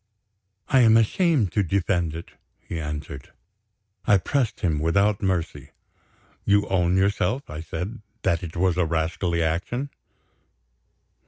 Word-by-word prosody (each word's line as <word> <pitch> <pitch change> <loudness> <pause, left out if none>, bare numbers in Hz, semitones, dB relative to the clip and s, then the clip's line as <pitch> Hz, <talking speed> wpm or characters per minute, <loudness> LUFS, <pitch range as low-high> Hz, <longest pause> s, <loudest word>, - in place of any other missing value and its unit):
"I 135 - +5
am 115 -2 +6
ashamed 120 - +2
to 105 - +1
defend 90 -3 0
it," 85 - -8 0.3
he 85 - -6
answered. 75 -1 -6 0.7
I 100 -2 +6
pressed 125 +4 -1
him 80 -4 +1
without 100 +6 +2
mercy. 85 -7 -2 0.7
"You 100 0 +3
own 90 -1 +2
yourself," 100 +6 +1
I 75 +1 -5
said, 90 +8 -5 0.2
"that 85 - +1
it 85 -2 -7
was 90 0 +1
a 90 - +2
rascally 85 +1 -1
action?" 105 - -2
90 Hz, 130 wpm, -24 LUFS, 85-105 Hz, 0.7 s, am